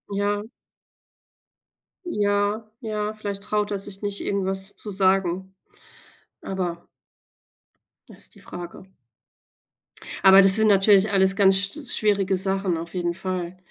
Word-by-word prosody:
Ja. 205 Hz, +1 st, -1 dB, 1.6 s
Ja, 205 Hz, -, -1 dB
ja, 215 Hz, -2 st, -4 dB
vielleicht 200 Hz, -2 st, -6 dB
traut 210 Hz, 0 st, -2 dB
er 200 Hz, -, -2 dB
sich 195 Hz, 0 st, -5 dB
nicht, 205 Hz, -1 st, -3 dB
irgendwas 195 Hz, 0 st, -3 dB
zu 210 Hz, -, -4 dB
sagen. 190 Hz, -1 st, 0 dB, 0.9 s
Aber 175 Hz, -3 st, -5 dB, 1.2 s
Da -, -, -14 dB
ist -, -, -12 dB
die -, -, -16 dB
Frage. 175 Hz, +1 st, -10 dB, 1.4 s
Aber 190 Hz, 0 st, +8 dB
das 195 Hz, 0 st, +9 dB
sind 220 Hz, 0 st, +5 dB
natürlich 200 Hz, 0 st, +4 dB
alles 190 Hz, -1 st, +3 dB
ganz 195 Hz, -2 st, +4 dB
sch 195 Hz, +10 st, -1 dB, 0.2 s
schwierige 200 Hz, -3 st, +1 dB
Sachen. 190 Hz, -1 st, 0 dB
Auf 170 Hz, +1 st, -7 dB
jeden 175 Hz, -1 st, -2 dB
Fall. 185 Hz, -1 st, -5 dB
195 Hz, 125 wpm, -23 LUFS, 190-205 Hz, 1.6 s, das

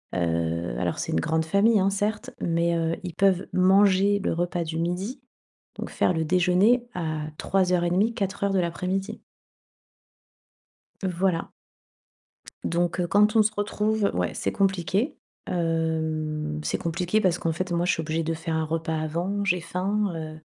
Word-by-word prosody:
heu, 85 Hz, -4 st, -1 dB
alors -, -, -1 dB
c'est -, -, -3 dB
une 80 Hz, -, +2 dB
grande 160 Hz, 0 st, 0 dB
famille, 205 Hz, +6 st, +4 dB
hein, 195 Hz, +1 st, +3 dB
certes 205 Hz, +2 st, -2 dB
mais, 170 Hz, 0 st, +1 dB
heu, 165 Hz, 0 st, 0 dB
ils 180 Hz, -, -5 dB
peuvent 190 Hz, -2 st, +2 dB
manger 195 Hz, +2 st, +4 dB
le -, -, 0 dB
repas 175 Hz, 0 st, -1 dB
du 160 Hz, 0 st, -4 dB
midi 190 Hz, +10 st, -3 dB, 0.6 s
donc -, -, -4 dB
faire -, -, +2 dB
le 160 Hz, -1 st, 0 dB
déjeuner 185 Hz, +8 st, +3 dB
à 155 Hz, -3 st, -2 dB, 0.2 s
15:30, 180 Hz, +3 st, +1 dB
16:00 200 Hz, -1 st, -1 dB
de 190 Hz, -, +3 dB
l'après-midi. 180 Hz, +3 st, -2 dB, 1.8 s
Voilà. 180 Hz, -1 st, 0 dB, 1.1 s
Donc, 175 Hz, +1 st, 0 dB
heu, 175 Hz, -, +1 dB
quand 210 Hz, +4 st, +4 dB
on 220 Hz, -, +7 dB
se 215 Hz, 0 st, +2 dB
retrouve, 210 Hz, 0 st, 0 dB
ouais, -, -, -1 dB
c'est -, -, -1 dB
compliqué, 195 Hz, -, 0 dB, 0.3 s
hem, 160 Hz, -, -1 dB
c'est 75 Hz, -, -1 dB
compliqué 175 Hz, +5 st, 0 dB
parce 180 Hz, -4 st, +1 dB
qu'en 165 Hz, -, 0 dB
fait 180 Hz, +2 st, -3 dB
moi 170 Hz, 0 st, +1 dB
je -, -, +3 dB
suis 160 Hz, -, -2 dB
obligée 160 Hz, +1 st, -1 dB
de 165 Hz, +1 st, -1 dB
faire 160 Hz, 0 st, -3 dB
un 160 Hz, 0 st, 0 dB
repas 160 Hz, 0 st, -2 dB
avant, 175 Hz, +6 st, -2 dB
j'ai 180 Hz, -3 st, +1 dB
faim, 195 Hz, +3 st, -1 dB
heu, 155 Hz, -1 st, -6 dB
175 Hz, 160 wpm, -25 LUFS, 165-195 Hz, 1.8 s, on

